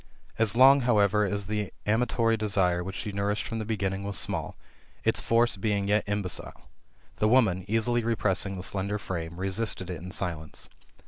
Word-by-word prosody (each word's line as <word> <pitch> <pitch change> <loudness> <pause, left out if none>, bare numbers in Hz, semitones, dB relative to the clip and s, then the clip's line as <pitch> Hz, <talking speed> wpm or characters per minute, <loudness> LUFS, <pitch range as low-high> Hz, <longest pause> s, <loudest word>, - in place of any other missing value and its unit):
As 115 -1 +2
long, 135 +3 +7
however, 105 -4 +3
as 100 0 -2
the 105 -1 -3
amatory 115 +1 +1
desire, 95 -5 +1
which 95 +1 -6
she 105 - -4
nourished 100 +1 -1
from 115 - -4
the 110 - -4
beginning, 100 -3 -2
was 100 0 -3
small, - - -2 0.5
its - - +1
force 115 -2 +2
being 100 0 -1
yet 105 +1 +3
imbecile, 100 -2 -3 0.5
the 105 - +2
woman, 110 -7 +3
easily 115 +2 +1
repressing 100 -4 +1
the 90 - -6
slender 100 +2 -1
flame, 85 -5 -6
resisted 95 -1 -1
it 85 -3 -6
in 90 - -8
silence. 85 -5 -5
100 Hz, 170 wpm, -27 LUFS, 95-110 Hz, 0.5 s, long